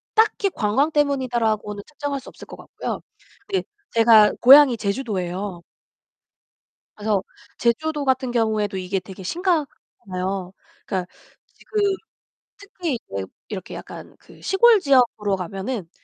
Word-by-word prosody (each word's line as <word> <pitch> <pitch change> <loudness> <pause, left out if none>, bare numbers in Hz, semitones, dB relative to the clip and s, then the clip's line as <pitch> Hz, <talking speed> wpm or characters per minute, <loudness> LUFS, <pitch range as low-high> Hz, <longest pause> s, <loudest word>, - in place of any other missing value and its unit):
딱히 435 -2 +3
관광 265 +8 +1
때문이다라고는 240 -8 0
측정할 290 -2 -4
수 260 - -12
없을 - - -13
것 - - -9
같고요. - - -6 0.5
근데 390 -2 -1 0.3
제가 225 -2 +6
고향이 265 -1 +8
제주도에요. 200 -5 -3 1.3
그래서 210 -2 0 0.4
제주도 295 +5 0
같은 260 -1 +1
경우에도 220 -4 0
이게 190 +1 -2
되게 190 0 -11
심각하잖아요. 195 - -3 0.3
그러니까 185 -2 -2 0.4
지금 425 -1 -5 0.8
특히 370 - -4 0.2
이제 95 -1 -3 0.2
이렇게 190 -4 -6
약간 - - -10
그 - - -18
시골 445 +1 +5
지역으로 245 - +2
가면은 190 +2 -5
230 Hz, 300 characters per minute, -22 LUFS, 195-290 Hz, 1.3 s, 고향이